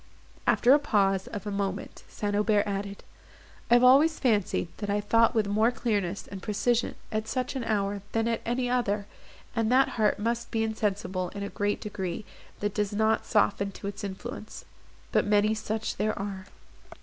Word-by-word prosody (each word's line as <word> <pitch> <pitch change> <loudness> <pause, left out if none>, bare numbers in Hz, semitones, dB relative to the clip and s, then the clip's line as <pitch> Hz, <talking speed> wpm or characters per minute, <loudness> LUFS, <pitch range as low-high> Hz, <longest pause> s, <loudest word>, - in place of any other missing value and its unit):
After 245 - +4
the 290 - +7
pause 195 -8 +1
of 205 0 -6
a 205 - -3
moment, 200 -1 -3
St. 205 -1 -2
Aubert 210 0 +3
added, 200 0 -4 0.7
"I 240 - +7
have 240 - +5
always 285 +6 +6
fancied, 210 -8 +1
that 205 -1 -4
I 205 +1 +1
thought 230 +3 +3
with 220 -2 +3
more 215 +3 +3
clearness, 210 -6 -1
and 195 -1 -8
precision, 230 +4 0 0.2
at 215 0 -2
such 255 +3 -2
an 260 - -2
hour 205 -2 -1
than 225 0 0
at 230 -1 0
any 245 +2 -1
other, 215 -5 0 0.5
and 225 0 +1
that 265 +2 +5
heart 215 -2 +1
must 235 +3 -2
be 225 -1 0
insensible 205 -4 -1
in 200 - -4
a 200 - -4
great 205 0 -1
degree, 195 -2 -4 0.4
that 205 -1 -1
does 210 -1 -1
not 220 +1 +1
soften 200 -2 +2
to - - -10
its 205 +1 -5
influence. 200 +2 -7 0.5
But - - +3
many 210 +1 +3
such 220 0 -3
there 215 0 0
are." 195 -1 -5
210 Hz, 180 wpm, -28 LUFS, 200-230 Hz, 0.7 s, the